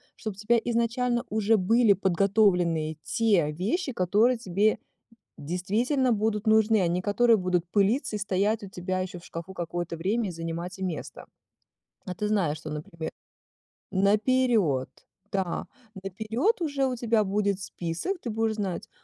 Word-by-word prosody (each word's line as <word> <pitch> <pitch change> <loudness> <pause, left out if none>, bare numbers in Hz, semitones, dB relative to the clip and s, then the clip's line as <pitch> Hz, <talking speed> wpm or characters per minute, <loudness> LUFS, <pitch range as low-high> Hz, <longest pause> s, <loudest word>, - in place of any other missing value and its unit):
Чтоб 215 -2 -5
у - - -23
тебя 225 +3 +2
изначально 240 +1 0
уже 215 +1 +2
были 215 +2 +4
подготовленные 180 -4 +2
те 200 -10 +2
вещи, 225 - -1
которые 220 +5 +2
тебе 205 0 +1 0.6
действительно 220 - 0
будут 215 0 -1
нужны, 220 0 +4
а 175 - +2
не 180 +2 -1
которые 225 +4 +4
будут 180 -3 0
пылиться 210 - +1
и - - -3
стоять 200 +2 0
у 195 - -9
тебя 185 0 -3
еще 185 -1 -5
в 170 - -16
шкафу 170 +3 -7
какое-то 175 -1 -4
время, 205 +6 -1
и - - -5
занимать 170 +2 -5
и 190 - -3
место. 175 -4 -5 0.8
А 180 - -5
ты 210 - -2
знаешь, 175 -8 +1
что, 155 - -8
например, 155 +2 -6 0.8
наперёд, 205 - +2 0.4
да, 190 -3 -2 0.4
наперёд 225 - -1
уже 285 -4 0
у 255 - -2
тебя 230 -2 +2
будет 200 0 0
список, 180 - -4
ты 240 - -4
будешь 225 0 0
знать: 195 -5 -4
200 Hz, 150 wpm, -27 LUFS, 180-225 Hz, 0.8 s, были